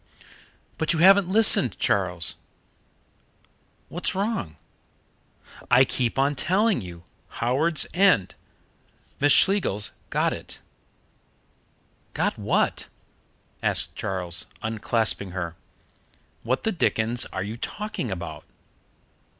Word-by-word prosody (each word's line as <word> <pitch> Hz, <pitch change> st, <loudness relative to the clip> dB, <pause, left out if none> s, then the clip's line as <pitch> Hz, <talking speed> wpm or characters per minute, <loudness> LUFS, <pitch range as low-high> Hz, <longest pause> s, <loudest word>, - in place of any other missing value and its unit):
"But 160 Hz, +1 st, +1 dB
you -, -, -1 dB
haven't 190 Hz, +2 st, +6 dB
listened, 210 Hz, -, +5 dB
Charles 90 Hz, -4 st, 0 dB, 0.8 s
" -, -, -39 dB
"What's 175 Hz, +2 st, -2 dB
wrong?" 195 Hz, -, -2 dB, 1.1 s
"I 130 Hz, +2 st, +6 dB
keep 125 Hz, -1 st, -2 dB
on 140 Hz, +2 st, +2 dB
telling 190 Hz, -, +1 dB
you 85 Hz, -2 st, -10 dB, 0.3 s
Howards 145 Hz, +8 st, +2 dB
End. 175 Hz, -, +3 dB, 0.9 s
Miss 145 Hz, +1 st, +3 dB
Schlegels 180 Hz, -, +2 dB, 0.2 s
got -, -, +1 dB
it." -, -, -9 dB, 1.6 s
"Got -, -, 0 dB
what?" -, -, 0 dB, 0.7 s
asked -, -, -1 dB
Charles, 90 Hz, -3 st, -3 dB, 0.2 s
unclasping 110 Hz, -3 st, 0 dB
her. 85 Hz, -3 st, -4 dB, 0.9 s
"What 125 Hz, +3 st, -1 dB
the 220 Hz, -, 0 dB
dickens 120 Hz, -, 0 dB
are 95 Hz, -, -4 dB
you 105 Hz, +3 st, -5 dB
talking 205 Hz, -, -5 dB
about?" 85 Hz, -5 st, -6 dB
120 Hz, 100 wpm, -24 LUFS, -, 1.6 s, haven't